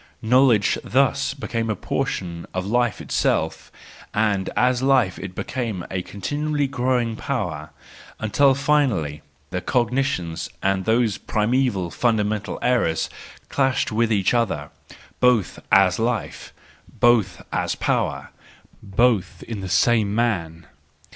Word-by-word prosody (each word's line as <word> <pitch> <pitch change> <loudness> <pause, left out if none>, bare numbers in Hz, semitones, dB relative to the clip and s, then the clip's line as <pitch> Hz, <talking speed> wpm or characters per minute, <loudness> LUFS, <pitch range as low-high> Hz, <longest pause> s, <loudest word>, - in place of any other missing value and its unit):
Knowledge, 120 -2 +4
thus 115 - +1
became 115 -1 -3
a 110 - 0
portion 85 -2 -3
of 95 0 -2
life 120 +1 0
itself, - - -1 0.4
and 105 -3 +1
as 125 0 +2
life 130 -8 +2
it 95 -1 -7
became 115 -9 -3
a 95 - -1
continually 145 +10 -2
growing 125 -3 0
power: 85 - -3 0.5
until 135 +5 +3
finally 130 - +1 0.3
the 90 0 -2
cognitions 120 -6 -1
and 95 -1 +1
those 110 -2 +1
primeval, 110 -5 0
fundamental 110 -2 0
errors 115 -11 +1 0.4
clashed 135 -4 +1
with 115 +1 +1
each 100 -1 +2
other, 95 -12 -1 0.5
both 125 -6 +2
as 95 -1 +5
life, 115 -1 -2 0.5
both 115 -6 +3
as - - 0
power, - - -1 0.5
both 105 -1 +1
in 110 -4 -6
the 95 - -5
same 110 -1 +2
man. 85 -9 -1
110 Hz, 115 wpm, -22 LUFS, 95-125 Hz, 0.5 s, as